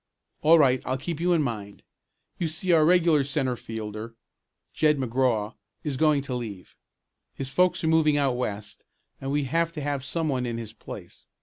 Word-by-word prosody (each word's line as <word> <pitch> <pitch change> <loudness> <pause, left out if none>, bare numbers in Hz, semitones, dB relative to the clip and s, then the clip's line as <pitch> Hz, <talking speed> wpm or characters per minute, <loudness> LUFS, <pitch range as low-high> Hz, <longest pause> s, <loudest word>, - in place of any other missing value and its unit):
"All 160 +2 +7
right, 130 -4 +4
I'll 130 +1 -1
keep 160 +4 -4
you 175 +1 +1
in 165 -3 +3
mind. 105 -6 -5 0.6
You 170 - 0
see 160 +4 -2
our 160 -2 +6
regular 165 -3 +4
centre 135 -2 -1
fielder, 110 0 -7 0.6
Jed 150 -1 +3
McGraw, 125 -4 0 0.3
is 150 -3 -2
going 150 0 +3
to 140 - -5
leave. 110 -7 -6 0.6
His 135 -1 -4
folks 180 +3 +2
are - - +1
moving 160 -2 +4
out 135 -3 +2
west 105 -4 -4 0.4
and 135 0 -3
we'll 145 0 +1
have 165 +4 0
to 155 - -5
have 140 -2 -2
some 165 +3 -2
one 130 -4 -1
in 115 -1 -3
his 115 -2 -7
place. - - -11
135 Hz, 185 wpm, -26 LUFS, 120-155 Hz, 0.6 s, All